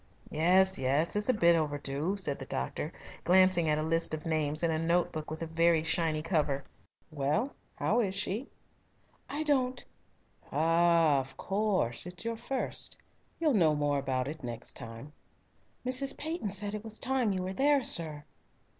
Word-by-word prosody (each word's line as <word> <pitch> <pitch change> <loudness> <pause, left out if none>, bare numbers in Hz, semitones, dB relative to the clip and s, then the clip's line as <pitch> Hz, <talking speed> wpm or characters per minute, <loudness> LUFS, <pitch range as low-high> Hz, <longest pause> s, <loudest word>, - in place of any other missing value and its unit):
"Yes, 185 +4 +4
yes. 140 +7 +1
It's 210 +3 +2
a - - +5
bit 170 -4 +5
overdue," 150 +3 -1
said 160 -8 +2
the - - -6
doctor, - - -3 0.3
glancing 185 -2 +4
at 150 - +2
a 155 - -1
list 165 0 +1
of 155 - -10
names 155 -1 0
in 165 - +2
a 160 - 0
note 170 +2 +1
book 155 -1 -6
with 160 +2 -5
a - - -2
very 165 0 +2
shiny 160 -1 0
cover. 150 -5 0 0.5
"Well, 150 - 0 0.2
how 230 - +1
is 195 -5 0
she?" 205 +6 -3 0.8
"I 300 +2 -2
don't 260 -4 0 0.4
" - - -30
"Ah, 165 -1 +3
of 135 0 -7
course, 195 - -1
it's 180 +5 -8
your 230 0 -2
first. 260 +3 -2 0.4
You'll 310 -4 +2
know 165 -8 +4
more 145 -1 +1
about 130 -1 -1
it 155 0 -7
next 120 -2 -6
time." 115 +4 -9 0.7
"Mrs. 260 +2 +1
Peyton 315 - -3
said 200 +1 -1
it 210 0 -5
was 220 -1 -6
time 255 -4 0
you 185 -1 -2
were 185 +1 -3
there, 280 +4 +3
sir." 155 -8 +1
170 Hz, 170 wpm, -30 LUFS, 150-205 Hz, 0.8 s, a